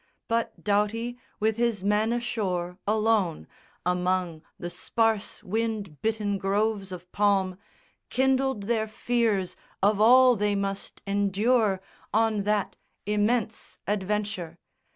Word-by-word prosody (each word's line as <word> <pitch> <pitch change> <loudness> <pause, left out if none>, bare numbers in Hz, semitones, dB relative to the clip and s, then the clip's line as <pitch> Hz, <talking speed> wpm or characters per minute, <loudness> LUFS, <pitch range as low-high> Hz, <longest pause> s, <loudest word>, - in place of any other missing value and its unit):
But 230 -1 -1
Doughty 220 +4 0 0.2
with 220 +1 +1
his 230 -5 0
men 210 +2 +2
ashore, 190 -7 -2
alone, 210 - +1 0.4
Among 180 -2 0 0.2
the 175 - -5
sparse 225 0 0
wind 210 -6 -3
bitten 210 -3 0
groves 200 0 0
of 180 0 -9
palm, 195 -2 +1 0.5
Kindled 265 -3 +1
their 220 +1 0
fears 220 -4 0 0.3
of 205 +1 +3
all 250 +2 +7
they 205 -1 +1
must 195 0 -4
endure 200 +1 +2 0.3
On 220 -2 +2
that 210 -2 0 0.3
immense 210 +2 0
adventure. 205 -4 -2
210 Hz, 110 wpm, -27 LUFS, 195-225 Hz, 0.5 s, all